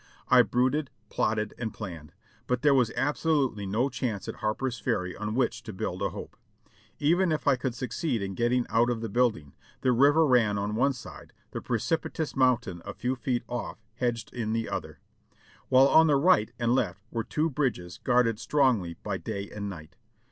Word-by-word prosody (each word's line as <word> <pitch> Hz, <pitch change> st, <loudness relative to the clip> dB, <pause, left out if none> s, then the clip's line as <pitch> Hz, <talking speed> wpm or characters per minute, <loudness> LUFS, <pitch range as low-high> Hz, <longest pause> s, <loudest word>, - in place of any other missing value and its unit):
I 125 Hz, 0 st, +8 dB
brooded, 130 Hz, +6 st, +1 dB, 0.2 s
plotted 105 Hz, -1 st, -1 dB
and 115 Hz, -2 st, -3 dB
planned, 85 Hz, -8 st, -8 dB, 0.4 s
but 125 Hz, 0 st, -1 dB
there 145 Hz, -2 st, +5 dB
was 125 Hz, -4 st, +3 dB
absolutely 140 Hz, -7 st, 0 dB
no 110 Hz, +7 st, +1 dB
chance 115 Hz, -7 st, -3 dB
at -, -, -5 dB
Harper's 120 Hz, +2 st, -2 dB
Ferry 90 Hz, -2 st, -1 dB
on 105 Hz, +1 st, -4 dB
which 130 Hz, -1 st, 0 dB
to 110 Hz, -, -8 dB
build 95 Hz, 0 st, -4 dB
a 100 Hz, -, +1 dB
hope. -, -, -9 dB, 0.6 s
Even 170 Hz, +4 st, +2 dB
if 155 Hz, -2 st, -2 dB
I 140 Hz, -, +6 dB
could 125 Hz, -1 st, -3 dB
succeed 120 Hz, -1 st, -2 dB
in 95 Hz, 0 st, -4 dB
getting 120 Hz, +4 st, +1 dB
out 120 Hz, +2 st, +3 dB
of 120 Hz, -2 st, -2 dB
the 115 Hz, -, -3 dB
build 120 Hz, +1 st, +2 dB
ing, 75 Hz, -3 st, -15 dB, 0.3 s
the 130 Hz, -, +3 dB
river 145 Hz, +6 st, +5 dB
ran 115 Hz, -7 st, +3 dB
on 100 Hz, +1 st, -2 dB
one 135 Hz, +5 st, +2 dB
side, 125 Hz, -, -11 dB, 0.2 s
the -, -, -5 dB
precipitous 155 Hz, +6 st, -2 dB
mountain 125 Hz, -9 st, +1 dB
a -, -, -7 dB
few 125 Hz, +2 st, -1 dB
feet 125 Hz, -1 st, -2 dB
off 120 Hz, 0 st, -4 dB, 0.2 s
hedged 115 Hz, -2 st, -2 dB
in 110 Hz, -3 st, -2 dB
the 115 Hz, 0 st, -1 dB
other, -, -, -5 dB, 0.7 s
while 130 Hz, +1 st, +6 dB
on 160 Hz, +3 st, +6 dB
the 145 Hz, -, +4 dB
right 140 Hz, -6 st, +4 dB
and 120 Hz, 0 st, +1 dB
left 100 Hz, -6 st, -1 dB
were 115 Hz, -1 st, -2 dB
two 155 Hz, +6 st, -1 dB
bridges 110 Hz, -11 st, -2 dB
guarded 120 Hz, -3 st, +2 dB
strongly 120 Hz, -, +1 dB
by 100 Hz, -2 st, -2 dB
day 100 Hz, -2 st, -5 dB
and 100 Hz, -1 st, -5 dB
night. 80 Hz, -5 st, -10 dB
120 Hz, 190 wpm, -28 LUFS, 105-130 Hz, 0.7 s, I